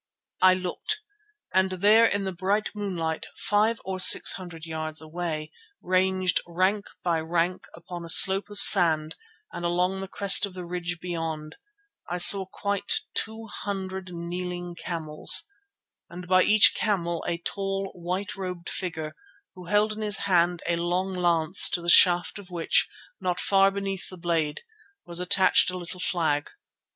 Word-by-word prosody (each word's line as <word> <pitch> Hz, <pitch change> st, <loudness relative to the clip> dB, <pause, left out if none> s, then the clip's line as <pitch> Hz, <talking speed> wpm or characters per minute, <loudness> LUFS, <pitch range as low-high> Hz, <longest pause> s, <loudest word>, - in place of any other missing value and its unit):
I 185 Hz, 0 st, +5 dB
looked, 185 Hz, -, -4 dB, 0.5 s
and 190 Hz, 0 st, +1 dB
there 210 Hz, +5 st, +4 dB
in 200 Hz, -2 st, -2 dB
the 190 Hz, -, -4 dB
bright 195 Hz, +4 st, -2 dB
moonlight 175 Hz, -6 st, -4 dB
five 215 Hz, +2 st, 0 dB
or 190 Hz, 0 st, -5 dB
six 185 Hz, -, +6 dB
hundred 175 Hz, -4 st, -8 dB
yards 155 Hz, -1 st, -4 dB
away, 155 Hz, -1 st, -5 dB, 0.3 s
ranged 185 Hz, -1 st, 0 dB
rank 185 Hz, +4 st, -1 dB, 0.2 s
by 170 Hz, -2 st, 0 dB
rank 170 Hz, +2 st, -2 dB
upon 170 Hz, +1 st, -10 dB
a 165 Hz, -, -9 dB
slope 195 Hz, +4 st, +5 dB
of 205 Hz, -, -9 dB
sand 160 Hz, -5 st, +6 dB, 0.4 s
and 175 Hz, -, -7 dB
along 180 Hz, +2 st, -1 dB
the 195 Hz, -, -6 dB
crest 200 Hz, +1 st, +3 dB
of 190 Hz, -, -14 dB
the 180 Hz, -1 st, -7 dB
ridge 175 Hz, 0 st, -5 dB
beyond, 165 Hz, -3 st, -6 dB, 0.5 s
I 175 Hz, -, -3 dB
saw 190 Hz, +2 st, +7 dB
quite 200 Hz, +1 st, -3 dB
two 220 Hz, +1 st, -4 dB
hundred 190 Hz, -3 st, -7 dB
kneeling 175 Hz, +1 st, -6 dB
camels, 165 Hz, -, +1 dB, 0.6 s
and 180 Hz, +1 st, -10 dB
by 185 Hz, 0 st, +4 dB
each 215 Hz, 0 st, +5 dB
camel 170 Hz, -6 st, -2 dB
a 170 Hz, -, -2 dB
tall, 195 Hz, +2 st, -4 dB
white 185 Hz, +4 st, -5 dB
robed 180 Hz, -3 st, -7 dB
figure 160 Hz, -4 st, -5 dB, 0.4 s
who 180 Hz, -1 st, -13 dB
held 210 Hz, +3 st, +1 dB
in 215 Hz, -, -8 dB
his 210 Hz, -2 st, +1 dB
hand 175 Hz, -2 st, +1 dB
a 170 Hz, -, 0 dB
long 180 Hz, +3 st, -2 dB
lance 175 Hz, -1 st, +3 dB
to -, -, 0 dB
the 170 Hz, 0 st, +1 dB
shaft 175 Hz, +3 st, +5 dB
of 195 Hz, -2 st, -14 dB
which, 170 Hz, -2 st, 0 dB, 0.3 s
not 180 Hz, -1 st, -3 dB
far 195 Hz, 0 st, +3 dB
beneath 195 Hz, -1 st, -5 dB
the 185 Hz, -, -11 dB
blade, 165 Hz, -3 st, -2 dB, 0.4 s
was 170 Hz, 0 st, -4 dB
attached 185 Hz, +1 st, +3 dB
a 185 Hz, -, -4 dB
little 180 Hz, +1 st, -9 dB
flag. 160 Hz, -5 st, -2 dB
180 Hz, 155 wpm, -25 LUFS, 170-195 Hz, 0.6 s, saw